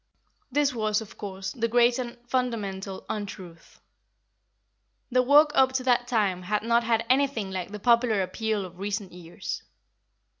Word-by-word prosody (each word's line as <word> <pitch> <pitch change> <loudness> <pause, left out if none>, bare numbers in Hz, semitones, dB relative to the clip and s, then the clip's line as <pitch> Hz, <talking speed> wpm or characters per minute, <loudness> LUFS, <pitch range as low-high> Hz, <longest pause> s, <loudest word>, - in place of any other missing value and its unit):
(This 290 0 +2
was, 215 -2 0
of 220 -2 -10
course, 190 -2 -6
the 230 -1 -1
great 240 +1 +3
and 240 -1 -5
fundamental 205 -7 -2
untruth. 195 -5 -7 1.3
The 255 +1 +4
work 295 +4 +6
up 260 -2 +4
to 260 -1 -1
that 245 -1 +2
time 200 -7 +1
had 210 +3 -1
not 235 +1 +3
had 230 0 +1
anything 260 -6 +1
like 185 -1 -4
the 210 - -5
popular 235 -2 +3
appeal 210 +2 -2
of 180 0 -12
recent 200 -1 -3
years.) 175 -1 -6
220 Hz, 150 wpm, -27 LUFS, 195-245 Hz, 1.3 s, work